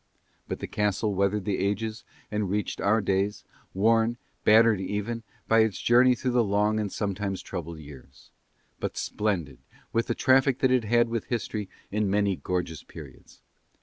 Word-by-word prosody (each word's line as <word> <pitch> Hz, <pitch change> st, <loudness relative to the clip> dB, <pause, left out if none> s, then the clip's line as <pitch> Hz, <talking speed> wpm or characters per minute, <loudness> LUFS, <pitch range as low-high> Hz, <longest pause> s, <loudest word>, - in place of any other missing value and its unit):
But -, -, -3 dB
the -, -, -4 dB
castle 105 Hz, 0 st, 0 dB
weathered 100 Hz, +1 st, 0 dB
the 100 Hz, -3 st, -1 dB
ages 105 Hz, +2 st, -2 dB, 0.3 s
and 105 Hz, -2 st, -1 dB
reached 105 Hz, +1 st, -2 dB
our 110 Hz, +2 st, +3 dB
days, 100 Hz, +1 st, 0 dB, 0.3 s
worn, 115 Hz, +3 st, +3 dB, 0.3 s
battered 110 Hz, -2 st, +5 dB
even, 105 Hz, +4 st, -3 dB, 0.3 s
by 115 Hz, -, +4 dB
its 110 Hz, -2 st, +2 dB
journey 125 Hz, +1 st, +5 dB
through 125 Hz, +1 st, -2 dB
the 120 Hz, -1 st, +3 dB
long 105 Hz, +1 st, +1 dB
and 105 Hz, -2 st, -2 dB
sometimes 100 Hz, -2 st, -2 dB
troubled 85 Hz, -3 st, -6 dB
years, 70 Hz, -3 st, -14 dB, 0.5 s
but -, -, -4 dB
splendid 90 Hz, -, -2 dB, 0.3 s
with 115 Hz, 0 st, +1 dB
the 120 Hz, -, -1 dB
traffic 130 Hz, 0 st, +3 dB
that 130 Hz, -1 st, +2 dB
it 125 Hz, -3 st, +2 dB
had 120 Hz, +2 st, +3 dB
with 115 Hz, -2 st, -2 dB
history 110 Hz, -4 st, -3 dB, 0.2 s
in 105 Hz, 0 st, 0 dB
many 100 Hz, -1 st, +2 dB
gorgeous 90 Hz, -4 st, -3 dB
periods. 70 Hz, -5 st, -13 dB
105 Hz, 160 wpm, -27 LUFS, 95-115 Hz, 0.5 s, battered